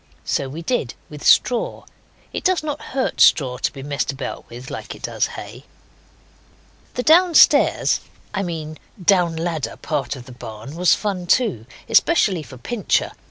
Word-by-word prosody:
So 135 - -1
we 160 +5 -7
did, 165 - -1 0.2
with 150 -1 -9
straw. 245 -2 +3 0.5
It - - -4
does 370 -4 +2
not 295 -2 -4
hurt 265 0 -2
straw 125 -4 +4
to - - 0
be 135 -2 -9
messed 145 0 -2
about 135 -1 -7
with 125 +2 -9
like - - -6
it - - -16
does - - 0
hay. - - -9 1.3
The 250 - -1
downstairs 340 +2 +5 0.3
I 195 - -1
mean 160 -4 -5 0.2
down 180 -2 +3
ladder 165 -2 -3
part 140 -6 -3
of 125 -2 -10
the 130 - -12
barn 120 +2 -9
was 180 +1 +4
fun 190 -4 -3
too, 185 - +1 0.2
especially 210 - +3
for 135 -3 -11
Pincher. 225 - -1
165 Hz, 160 wpm, -21 LUFS, 135-210 Hz, 1.3 s, downstairs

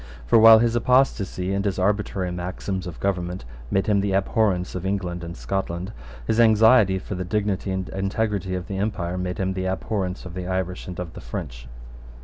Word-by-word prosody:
For, 115 - +5
while 110 0 +10
his 115 +1 +2
apostasy 115 -7 +1
and 100 0 0
his 100 -2 -1
arbitrary 100 -1 0
maxims 90 +1 -4
of 85 - -8
government 90 -4 -2 0.2
made 95 - +1
him 100 -2 +2
the 100 -1 -1
abhorrence 95 -2 +1
of 90 - -5
England 90 -3 -2
and 85 +1 -7
Scotland, 95 0 -3 0.3
his 110 - 0
anxiety 110 -3 +5
for 95 - -6
the 90 -1 -3
dignity 100 0 -1
and 95 -1 -2
integrity 100 -1 -2
of 90 -1 -4
the 95 -1 -4
empire 90 -4 -2
made 90 -1 -3
him 95 0 -1
the 95 0 -2
abhorrence 95 -1 -3
of 90 - -8
the 90 -1 -5
Irish 95 -1 -3
and 90 -1 -7
of 85 -2 -5
the - - -9
French. - - -7
95 Hz, 190 wpm, -24 LUFS, 90-105 Hz, 0.3 s, while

